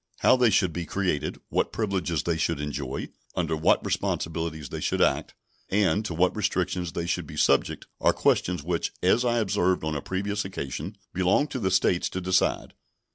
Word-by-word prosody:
How - - +6
they 125 -2 +4
should 95 -4 +2
be 85 0 -4
created, 95 -7 -1
what - - 0
privileges 95 -7 -1
they 85 - 0
should 80 -3 0
enjoy, 70 -2 -4 0.3
under 80 - 0
what 80 - +2
responsibilities 80 -3 -2
they - - -5
should - - 0
act, - - +1 0.3
and 100 0 +2
to 85 - -3
what 90 +2 +2
restrictions 95 -4 -1
they 85 - -2
should 85 - -2
be - - -9
subject - - +2
are - - +4
questions 90 -4 +1
which, 85 +1 -1
as 105 +7 +4
I 120 -1 +2
observed 95 -5 +1
on 80 0 -1
a 70 - -2
previous 100 +5 -2
occasion, 95 - -5 0.2
belong 95 +9 +3
to 130 - -4
the 95 -5 0
States 95 -1 +2
to 95 - -4
decide. 95 +1 +1
90 Hz, 185 wpm, -26 LUFS, 80-100 Hz, 0.3 s, How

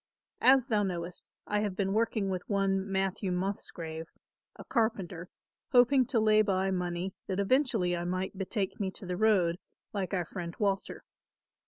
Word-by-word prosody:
As 260 -1 +6
thou 220 -6 +1
knowest, 180 -3 -4 0.2
I 210 - 0
have 205 -3 -1
been 195 0 0
working 215 -3 +1
with 185 -1 -2
one, 195 -1 +1
Matthew 190 0 0
Musgrave, 170 -3 -4 0.5
a - - -11
carpenter, 190 -7 -1 0.4
hoping 250 +1 +5
to 250 -4 +1
lay 215 0 +5
by 195 -2 +1
money 180 0 -2
that 190 0 -2
eventually 220 -5 +2
I 170 - -3
might 185 +2 -2
betake 195 +1 -3
me 195 -2 0
to 190 - -7
the 180 0 -2
road 185 -4 +3 0.3
like 195 -3 -2
our 175 -2 -1
friend 170 0 -6
Walter. 200 -2 -1
195 Hz, 160 wpm, -30 LUFS, 180-215 Hz, 0.5 s, As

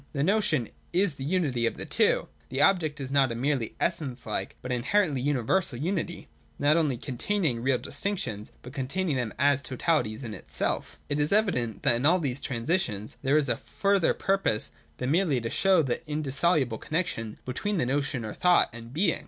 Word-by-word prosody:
The 140 -2 0
notion 195 - +2 0.2
is 180 -1 +2
the 135 - -8
unity 140 -7 +1
of - - -3
the - - -3
two; - - +3
and - - -16 0.2
the 130 - -3
object 160 -6 +2
is 135 -1 -5
not 135 -3 +3
a - - -3
merely 130 -2 -1
essence 145 -8 -2
like, 105 - -3
but 125 - -6
inherently 140 +3 +1
universal 140 +2 0
unity, 175 +3 -2 0.3
not 145 +2 +3
only 150 -7 +2
containing 135 - -1
real 130 +1 +2
distinctions, 125 - -3
but 125 - -10
containing 145 +5 -1
them 125 -4 -1
as 140 -1 +3
totalities 130 -4 -1
in 115 -3 -5
itself 70 -7 -3
It 145 - 0
is 145 0 +1
evident 180 - +1
that - - +6
in 130 +5 +2
all 175 +3 +5
these 140 -6 -2
transitions 115 - -2
there 140 +2 +3
is 150 -2 +2
a - - +2
further 200 -3 +1
purpose 195 - 0 0.3
than 125 +2 -1
merely 165 -6 +2
to 115 -1 -4
show 190 -4 +4
the 130 +1 -2
indissoluble 150 -4 +1
connexion 150 -10 -2
between 195 +11 -2
the 160 - +1
notion 135 -2 -1
or 105 - -5
thought 180 -1 +4
and 115 0 -10
being. 175 +9 +1
140 Hz, 185 wpm, -28 LUFS, 125-170 Hz, 0.3 s, that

